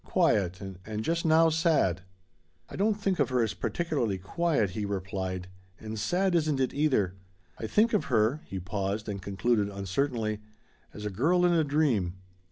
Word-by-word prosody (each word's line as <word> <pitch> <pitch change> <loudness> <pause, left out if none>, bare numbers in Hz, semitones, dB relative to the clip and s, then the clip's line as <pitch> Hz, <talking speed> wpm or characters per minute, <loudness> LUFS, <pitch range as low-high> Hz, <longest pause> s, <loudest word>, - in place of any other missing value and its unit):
Quiet 95 -4 +1 0.2
and 110 +1 -4
just 170 +4 -1
now, 160 +1 +5
sad." 155 - +2 0.7
"I - - -8
don't 210 +2 +2
think 195 -3 -1
of - - +2
her 125 -2 +2
as 110 - -1
particularly 140 - -1
quiet," 115 - 0
he 105 +3 -3
replied; 95 -2 -3 0.3
"and 110 0 -6
sad 185 - +1
isn't 155 -4 +1
it, 130 -2 0
either. 130 -11 +1 0.5
I 110 - -3
think 220 - +3
of 210 - +2
her" 120 +4 +2
he 95 - -5
paused 100 +3 -3
and 100 -2 -4
concluded 100 +2 0
uncertainly 110 +3 -1 0.5
"as 105 - -8
a 105 - -2
girl 170 - +2
in 175 - +4
a 165 -2 +3
dream." 140 - +1
110 Hz, 170 wpm, -29 LUFS, 100-160 Hz, 0.7 s, now